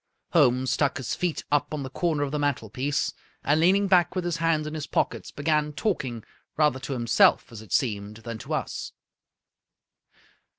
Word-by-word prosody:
Holmes 130 -7 +3
stuck 140 +2 +1
his 130 - -3
feet 180 -3 -2
up 145 +1 +1
on 145 - -4
the 130 - -5
corner 155 -2 0
of 140 - -3
the 150 - -1
mantelpiece, 140 0 -1 0.3
and, 150 +2 +3
leaning 190 +5 +4
back 180 -1 +3
with 185 -1 -1
his 175 -2 -1
hands 165 -2 +1
in 150 - -5
his 155 -2 -4
pockets, - - -1
began 150 0 0
talking, 130 - -2 0.3
rather 150 -4 +3
to 135 +2 -4
himself, 120 -3 +3
as 110 -2 -9
it 110 -5 -15
seemed, 105 -3 -1
than 115 -1 -5
to - - -3
us. - - -4
145 Hz, 175 wpm, -26 LUFS, 125-160 Hz, 0.3 s, leaning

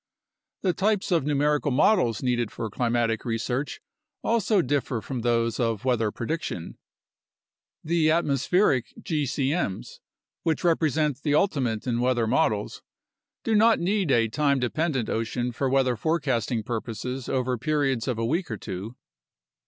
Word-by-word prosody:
The 185 -3 +2
types 205 0 0
of 165 -6 +2
numerical 150 0 +1
models 135 - +3
needed 120 -3 0
for 110 -2 -5
climatic 115 -1 0
research 120 +4 -2 0.4
also 220 -4 +2
differ 135 -3 -1
from 125 +3 -5
those 115 -1 +1
of 115 -2 -1
weather 115 -4 +2
prediction. 120 - -4 1.0
The 160 -1 +2
atmospheric 150 - +2
gcm's 145 - -2 0.4
(which 160 +2 -1
represent 155 -4 +1
the 145 -1 +1
ultimate 130 - +1
in 120 -2 0
weather 125 -2 +2
models 105 -1 0 0.3
) - - -65
do 225 - 0
not 220 +1 +5
need 190 0 0
a 115 -4 +4
time 140 +4 +1
dependent 130 0 -1
ocean 120 +2 -2
for 130 +3 -1
weather 130 -2 +2
forecasting 125 -5 0
purposes 120 +2 -4
over 130 -1 0
periods 135 -4 0
of 125 -4 -1
a 115 - -1
week 170 +9 -1
or 110 - -3
two. 100 +6 -6
130 Hz, 135 wpm, -26 LUFS, 115-155 Hz, 1.0 s, not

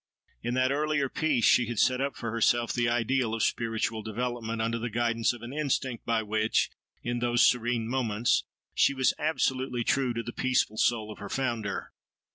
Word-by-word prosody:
In 120 +1 -2
that 130 +1 +2
earlier 145 -1 0
"Peace" 145 -7 +1
she 120 - +5
had 120 -1 -4
set 130 +4 +3
up 140 -1 -1
for 115 -2 -4
herself 115 +1 +2
the 120 -1 +1
ideal 120 0 +1
of 115 - -1
spiritual 115 -1 -1
development, 115 +1 -3
under 115 +1 -1
the 120 +1 -3
guidance 115 0 +1
of 120 -2 -10
an 120 +3 -7
instinct 135 -5 -2
by 115 -1 +1
which, 110 +1 +1 0.3
in 120 0 -2
those 120 0 +4
serene 120 -2 0
moments, 120 -3 +1 0.3
she 140 - +3
was 130 -1 +2
absolutely 130 -5 0
true 130 +1 +1
to 115 - -2
the 120 - -6
peaceful 125 -4 +1
soul 110 -2 +1
of - - -10
her 100 - -7
Founder. 115 -6 -2
120 Hz, 185 wpm, -28 LUFS, 115-130 Hz, 0.3 s, she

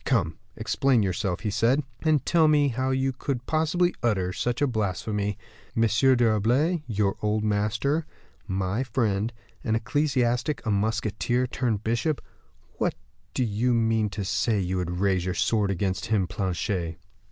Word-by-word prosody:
"Come, 85 - 0 0.2
explain 130 -5 +2
yourself," 95 -1 -1
he 105 - -1
said, 120 +7 +2 0.2
"and 155 -4 +2
tell 165 -2 +4
me 145 -2 +4
how 130 +2 -1
you 130 0 +1
could 125 -1 -3
possibly 160 +3 +1
utter 95 -6 +1
such 120 +4 -1
a 145 - +3
blasphemy. 105 -3 -1 0.4
M. 115 - +4
d'Herblay, 120 - +3
your 105 -3 0
old 105 0 0
master, 110 +9 0 0.4
my 95 +4 -1
friend, 110 -4 0 0.3
an 110 - +1
ecclesiastic, 125 +1 0
a 110 - +1
musketeer 110 +4 0
turned 115 -4 -1
bishop 120 +7 0 1.2
do 130 - +2
you 120 +2 +1
mean 110 -2 +2
to 100 0 -4
say 105 +1 +1
you 95 0 -1
would 90 0 -2
raise 95 -2 +2
your 90 0 -2
sword 105 -3 +1
against 95 +3 -1
him, 105 -4 +2
Planchet?" 90 -2 -2
110 Hz, 145 wpm, -26 LUFS, 100-130 Hz, 1.2 s, tell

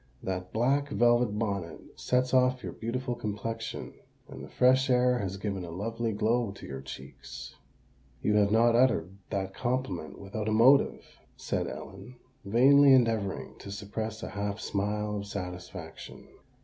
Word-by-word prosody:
That 90 -1 -4
black 140 +5 +1
velvet 120 -4 +3
bonnet 100 -7 -2 0.2
sets 125 0 0
off 125 0 +3
your - - -4
beautiful 125 +2 -3
complexion; 115 0 -5 0.3
and - - -9
the - - -9
fresh 130 +2 +3
air 125 0 +3
has 95 -2 -3
given 100 -2 -3
a 85 - -7
lovely 115 +6 -3
glow 110 +2 +1
to - - -11
your 65 -1 -6
cheeks." 65 - -9 0.7
"You 105 - +2
have 100 -1 +3
not 115 +1 +4
uttered 115 -8 +2
that 95 -2 -2
compliment 120 - -3
without 105 +2 -4
a - - +1
motive," 130 +6 +5 0.3
said - - -2
Ellen, 125 +1 -9 0.3
vainly 135 +7 +6
endeavouring 115 -6 +1
to - - -9
suppress 110 +2 -5
a - - -4
half 100 +1 -3
smile 105 0 -2
of 100 0 -5
satisfaction. 90 -3 -7
110 Hz, 150 wpm, -29 LUFS, 100-125 Hz, 0.7 s, vainly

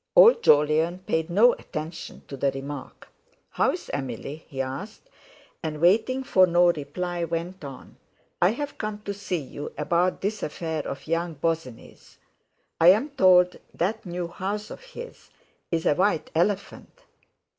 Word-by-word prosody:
Old - - +8
Jolyon 155 - +4
paid 160 +1 0
no 215 +8 +6
attention 155 +2 -7
to 140 - -7
the 140 +1 +1
remark. 135 +1 -7 0.4
"How's - - 0
Emily?" 140 +3 -5
he 135 -4 -8
asked; 135 - -5 0.5
and 155 -2 -4
waiting 220 - +3
for 185 -7 +5
no 175 0 +5
reply, 170 +3 -4
went 170 +2 -4
on 135 -2 -10 0.4
"I've 235 +11 0
come 210 -1 -4
to 200 - -2
see 200 -2 -3
you 145 -1 -7
about 180 +2 +1
this 210 +2 -2
affair 160 0 -3
of 140 - -6
young 165 +1 -1
Bosinney's. 160 -5 -4 0.6
I'm 200 - +5
told 180 -7 +5 0.2
that 215 +6 -1
new 175 -1 -4
house 200 +4 -4
of - - -9
his - - -11 0.4
is 165 -1 -1
a - - +5
white 185 0 +1
elephant." 195 +4 -1
175 Hz, 140 wpm, -25 LUFS, 155-200 Hz, 0.6 s, Old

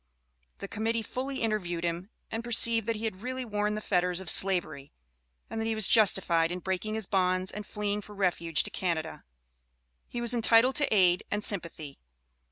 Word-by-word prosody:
The 200 - -7
Committee 225 +2 -2
fully 265 +4 -5
interviewed 180 -6 -2
him, 170 +3 -4 0.2
and 225 +1 -4
perceived 230 -1 +4
that 230 - -1
he 215 - -7
had 200 -4 -4
really 255 +1 -5
worn 210 -1 -2
the 215 - -5
fetters 180 -3 0
of 190 -4 -1
Slavery, 155 -7 +2 0.6
and 225 - -5
that - - -3
he 225 - -1
was 215 -3 +1
justified 180 -6 +4
in 180 - -3
breaking 190 +4 -4
his 220 -2 -2
bonds 185 -1 0
and 210 -1 -8
fleeing 210 0 -3
for 210 +1 -13
refuge 175 -4 0
to - - -6
Canada, 165 -3 -4 0.9
and 240 - -4
was 235 +1 +1
entitled 235 +2 +3
to 290 -2 0
aid 180 -4 +3
and 205 +1 -3
sympathy. 165 -8 -3
205 Hz, 180 wpm, -28 LUFS, 180-225 Hz, 0.9 s, perceived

